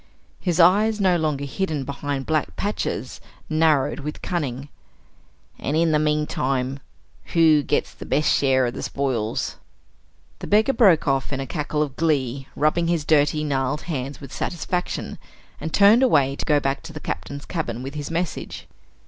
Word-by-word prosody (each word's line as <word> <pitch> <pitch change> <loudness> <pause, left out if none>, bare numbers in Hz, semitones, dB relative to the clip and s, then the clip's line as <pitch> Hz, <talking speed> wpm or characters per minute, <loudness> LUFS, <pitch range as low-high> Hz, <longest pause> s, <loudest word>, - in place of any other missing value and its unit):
His 175 -2 -1
eyes, 210 +5 +5
no 185 -3 +3
longer 150 -4 -1
hidden 150 0 -2
behind 140 0 -4
black 155 -2 -1
patches, 205 +1 -3 0.3
narrowed 155 -3 +2
with 150 +1 -6
cunning. 140 -6 -3 0.9
"And 150 - -1
in 165 0 +3
the 150 - +3
meantime, 140 -3 0 0.6
who 160 -3 +6
gets - - -1
the - - -10
best 150 +3 +1
share 130 -2 +3
of 120 - -2
the - - -6
spoils?" 125 -6 -2 0.8
The - - -7
beggar 220 +6 +3
broke 190 - +4
off 135 0 0
in 135 - -2
a 135 - -3
cackle 150 0 -1
of 140 -3 -6
glee, 135 -5 0
rubbing 160 +3 +1
his 165 -3 0
dirty 150 0 +3
gnarled 140 0 -1
hands 140 -4 -4
with 140 -3 -10
satisfaction, 180 +1 -3 0.4
and 160 +2 -4
turned 205 +7 +6
away 140 - +3
to - - -5
go 150 -2 +3
back 135 0 -1
to 160 - -10
the 155 - -6
Captain's 140 -1 -5
cabin 125 -8 -4
with 135 +1 -6
his 145 -1 -5
message. 170 +1 -4
150 Hz, 165 wpm, -23 LUFS, 135-165 Hz, 0.9 s, who